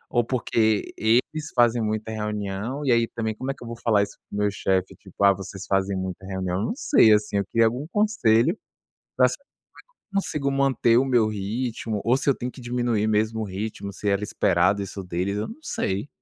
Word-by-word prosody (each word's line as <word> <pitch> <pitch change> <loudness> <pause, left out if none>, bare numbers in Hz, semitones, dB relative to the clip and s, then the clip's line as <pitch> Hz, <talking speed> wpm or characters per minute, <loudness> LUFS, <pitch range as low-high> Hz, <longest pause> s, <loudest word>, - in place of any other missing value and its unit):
ou 120 - +4
porque 110 -3 0
eles 130 +8 +1
fazem 120 -1 +4
muita 110 0 -2
reunião. 105 +5 -3
E 130 - +3
aí 115 -1 +3
também 110 -1 -3
como 130 +4 -5
é - - -6
que - - -13
eu - - -8
vou 115 - -5
falar 105 -3 +4
isso - - -7
pro 100 - -6
meu 105 0 +2
chefe, 95 -2 0
tipo: - - -7
"Ah 100 0 +7
vocês 95 0 -8
fazem 95 0 +1
muita 95 0 -5
reunião." 95 0 -2
Não - - -1
sei, 255 - +5
assim, 105 -1 +1
eu 100 - 0
queria 115 0 +4
algum 125 +7 -3
conselho 170 - +2 0.6
pra - - +6 0.9
conseguir 150 -8 -1
manter 135 -4 +3
o 130 - +4
meu 120 -4 +3
ritmo 110 +1 -3
ou 120 +3 +4
se 140 - 0
eu 135 - +3
tenho 125 +1 -4
que 130 - -12
diminuir 120 -3 0
mesmo 110 +1 +1
o - - -1
ritmo, 100 +1 -5
se 105 +1 -2
era 100 +1 +1
esperado 100 -1 +2
isso 100 0 -7
deles 90 +3 -2
eu 105 - -2
não 230 - -10
sei. 100 - -2
110 Hz, 205 wpm, -24 LUFS, 100-125 Hz, 0.9 s, Ah